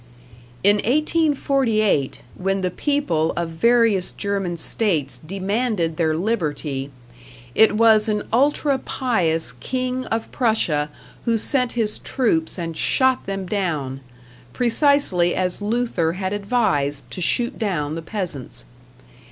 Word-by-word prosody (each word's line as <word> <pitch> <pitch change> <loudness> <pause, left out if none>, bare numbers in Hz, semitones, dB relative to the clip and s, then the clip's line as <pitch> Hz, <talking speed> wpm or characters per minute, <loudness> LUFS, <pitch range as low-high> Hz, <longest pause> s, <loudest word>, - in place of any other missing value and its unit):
In 205 +2 +5
1848, 265 - +1
when 195 +1 -1
the 185 -1 -1
people 180 - 0
of 170 -1 -1
various 225 +1 +3
German 195 -4 -2
states 155 - 0
demanded 195 - -1
their 160 -2 +1
liberty, 150 -8 -2 0.6
it 220 -1 +5
was 220 -1 +5
an 210 -1 0
ultra 280 +2 +2
pious 175 -13 0
king 255 0 -3
of 225 0 -3
Prussia 170 - +1 0.4
who 230 -1 +2
sent 250 +2 0
his 220 -3 0
troops 190 -12 0
and 165 -2 -4
shot 260 +8 +1
them 195 -1 -3
down 155 -9 -2 0.5
precisely 240 - +2
as 180 +1 -1
Luther 210 -7 0
had 190 +1 -3
advised 200 - 0
to 180 - -4
shoot 240 +7 0
down 170 -9 -1
the 165 - -4
peasants. 165 - -3
200 Hz, 120 wpm, -22 LUFS, 165-240 Hz, 0.6 s, In